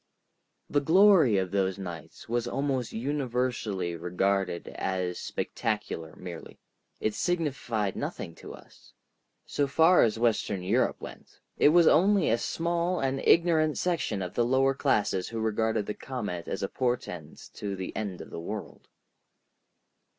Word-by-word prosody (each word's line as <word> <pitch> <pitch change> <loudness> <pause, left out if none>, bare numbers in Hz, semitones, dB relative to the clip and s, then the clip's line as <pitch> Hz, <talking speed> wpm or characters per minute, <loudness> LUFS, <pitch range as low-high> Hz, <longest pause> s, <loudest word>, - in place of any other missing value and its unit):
The 145 - +2
glory 165 - +6
of 95 -2 -1
those 95 -1 0
nights 90 -5 -8
was 120 +1 -1
almost 135 -2 -1
universally 120 -8 -2
regarded 90 +1 -1
as 90 -2 -2
spectacular 80 -1 -3
merely. 90 -3 -9 0.4
It 110 - 0
signified 135 - -1
nothing 85 - -5
to - - -10
us. - - -19 0.5
So 145 - 0
far 165 +6 +5
as 115 -1 +2
western 110 -5 0
Europe 115 +8 +1
went, - - -11 0.2
it - - +5
was 170 +2 +6
only 190 - +4
a 115 - +2
small 170 +5 -1
and 135 0 0
ignorant 160 -3 +4
section 135 - -1
of 90 - -6
the 120 - +2
lower 130 +3 +3
classes 105 -9 0
who 115 - -4
regarded 110 -1 0
the 105 - -3
comet 105 -11 -5
as 95 - -3
a - - +1
portent 120 - -4
of 100 -2 -3
the 95 - -6
end 100 -4 -4
of - - -11
the - - -6
world. 105 +5 -7
115 Hz, 145 wpm, -28 LUFS, 95-145 Hz, 0.5 s, glory